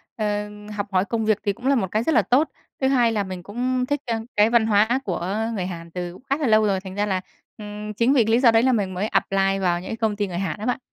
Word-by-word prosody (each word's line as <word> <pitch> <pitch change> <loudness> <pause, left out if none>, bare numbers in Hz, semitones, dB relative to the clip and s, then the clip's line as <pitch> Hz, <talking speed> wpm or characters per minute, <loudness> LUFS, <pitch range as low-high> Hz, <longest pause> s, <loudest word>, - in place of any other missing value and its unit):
ờ, 210 -1 -2 0.3
học 205 0 -3
hỏi 185 +1 +3
công 225 +2 -2
việc 215 -1 +3
thì 200 -2 0
cũng 250 +6 -6
là 280 - +4
một 210 -7 0
cái 215 +2 +1
rất 320 - +1
là - - +6
tốt. 280 +6 +2 0.3
Thứ 265 - +3
hai 245 -4 +3
là 210 -2 0
mình 185 -2 -7
cũng 250 +4 -1
thích, 290 +1 -1
ơ, 235 -2 -1 0.2
cái 210 +1 +5
văn 230 -2 +3
hóa 220 +4 +3
của 185 +1 -2 0.2
người 185 -3 -2
Hàn 170 -2 -7
từ 175 +1 -5
khá 275 - +2
là 295 - -1
lâu 215 -1 +4
rồi. 195 -2 +1
Thành 190 0 -9
ra 205 - 0
là, 190 -3 -1 0.4
ừm, 210 0 -7
chính 235 +6 +2
vì 250 -5 +5
cái 225 - 0
lý 235 - +4
do 245 -3 +6
đấy 225 +1 +4
là 260 - +4
mình 200 -5 0
mới 195 +4 -1
apply 195 -1 +1
vào 175 -2 +1
những - - -8
cái 225 - -4
công 220 -2 0
ty 205 -1 -1
người 175 -2 -5
Hàn 195 +2 -3
á 215 - -5
bạn. 250 - 0
210 Hz, 295 wpm, -23 LUFS, 195-235 Hz, 0.4 s, là